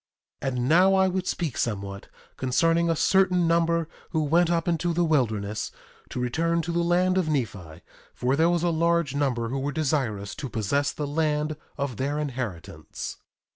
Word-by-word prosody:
1:27 - - -3
And 125 0 -1
now 185 +6 +5
I 190 0 +4
would 185 0 -2
speak 165 -7 -2
somewhat 100 -3 -3 0.3
concerning 165 +6 +2
a 165 - +2
certain 180 0 +3
number 170 -1 +2 0.2
who 160 -2 0
went 165 +3 +3
up 170 -1 0
into 170 0 +1
the 175 +1 +2
wilderness 110 -9 0 0.4
to - - -5
return 165 +7 0
to 170 - -3
the 170 - 0
land 180 +2 +2
of 165 -4 -1
Nephi; 95 - -3 0.3
for 130 +2 +1
there 165 +3 +3
was 175 -1 +1
a 175 - +2
large 170 -3 +1
number 130 -5 0
who 135 +2 -2
were 140 +2 -2
desirous 130 -9 -1
to 135 - -5
possess 120 +7 0
the 150 - -4
land 150 0 0 0.2
of 140 -5 -3
their 140 +3 -1
inheritance. 125 - -5
150 Hz, 175 wpm, -26 LUFS, 125-170 Hz, 0.4 s, now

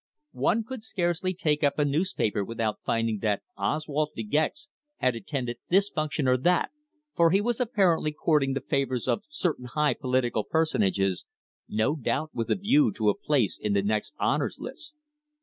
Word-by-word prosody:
One 225 - +3
could 235 0 -7
scarcely 185 -4 -1
take 155 -5 0
up 140 -1 +2
a 150 - +3
newspaper 145 - 0
without 110 0 -2
finding 115 -2 0
that 105 -2 0
Oswald 150 +7 -1
De 115 - -3
Gex 155 - -1 0.3
had 125 -2 +1
attended 120 +1 -3
this 195 +3 +4
function 155 -3 -1
or 125 0 +4
that, 175 +8 +2 0.4
for 170 -1 +5
he 190 +4 +4
was 235 +2 -1
apparently 190 -10 +2
courting 150 -3 +1
the 135 - -2
favours 135 -4 -1
of - - +1
certain 175 - -2
high 150 +4 +1
political 125 -4 0
personages, 100 - +1 0.4
no 110 +8 +1
doubt 155 +2 -2
with 115 -1 -3
a - - +3
view 240 +6 +3
to 110 - +1
a 105 - +2
place 135 -9 0
in 105 - 0
the 100 -1 +2
next 105 +1 -1
Honours - - 0
List. 305 -1 -7
150 Hz, 170 wpm, -27 LUFS, 115-175 Hz, 0.4 s, for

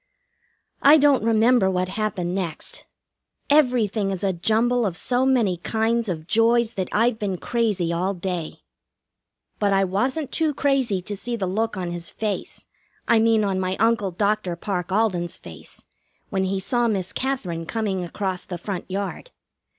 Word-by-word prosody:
I 290 +3 +8
don't 285 -5 +4
remember 225 -1 +4
what 185 -1 -1
happened 195 -3 -2
next. 180 -5 -4 0.7
Everything 235 -8 +3
is 190 -1 -3
a 195 -1 +1
jumble 230 +7 +1
of 185 -5 -1
so 255 +1 +1
many 230 -9 +2
kinds 225 +4 0
of 160 -3 -4
joys 230 +3 +3
that 185 -2 -3
I've 230 +1 +2
been 195 -3 -2
crazy 205 -7 0
all 185 +4 -1
day. 175 -2 -5 1.0
But 205 -1 +2
I 195 0 +3
wasn't 255 - -1
too 315 -3 0
crazy 260 -10 +1
to 205 +2 -4
see 235 +4 -4
the 205 -5 -2
look 210 +3 -1
on 180 -2 -3
his 170 -1 -4
face, 215 -2 -4 0.4
I 230 - +5
mean 225 -1 +3
on 195 -2 0
my 185 0 -1
Uncle 225 -3 +2
Dr. 200 0 0
Parke 180 0 -3
Alden's 185 -4 0
face, - - -12 0.5
when 190 -2 0
he 190 +1 -1
saw 240 +5 +1
Miss 195 -5 -1
Katherine 185 -12 -3
coming 205 -5 -2
across 185 +1 -3
the 180 - -6
front 185 +1 -5
yard. 200 - -4
205 Hz, 160 wpm, -23 LUFS, 185-230 Hz, 1.0 s, I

